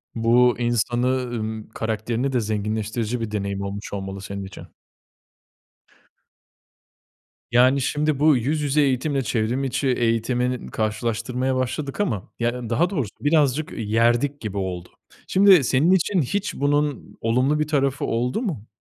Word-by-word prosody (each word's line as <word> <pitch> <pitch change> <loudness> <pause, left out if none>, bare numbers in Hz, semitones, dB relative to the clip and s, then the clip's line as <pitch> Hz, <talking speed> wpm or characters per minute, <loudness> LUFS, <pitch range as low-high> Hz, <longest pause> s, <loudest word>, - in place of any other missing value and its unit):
Bu 120 +2 +4
insanı, 120 +1 0
ııı, 120 -4 -3
karakterini 115 +4 -2
de 125 - +2
zenginleştirici 110 +2 -2
bir 110 -2 -4
deneyim 100 -1 -3
olmuş 100 +1 -6
olmalı 95 -1 -5
senin 100 0 -6
için. 95 - -10 2.8
Yani, 130 +3 +4
şimdi 150 +1 0
bu 150 -2 +5
yüz 150 +6 -1
yüze 145 +1 +2
eğitimle 135 +1 +1
çevrimiçi 125 +4 -1
eğitimini 125 +1 0
karşılaştırmaya 115 +4 -1
başladık 135 +5 -3
ama, 115 - -2
ya, 120 0 -2
daha 165 +10 +2
doğrusu 140 - -2
birazcık, 150 -1 +2
ııı, - - -7
yerdik 120 +6 +1
gibi 105 -3 -5
oldu. 90 -2 -4 0.4
Şimdi 190 -5 +6
senin 135 +7 +3
için 190 0 +2
hiç 200 +9 -2
bunun 145 -1 -1
olumlu 130 +6 +2
bir 150 - 0
tarafı 140 -1 0
oldu 125 - -1
mu? 155 - -4
125 Hz, 130 wpm, -23 LUFS, 110-140 Hz, 2.8 s, Şimdi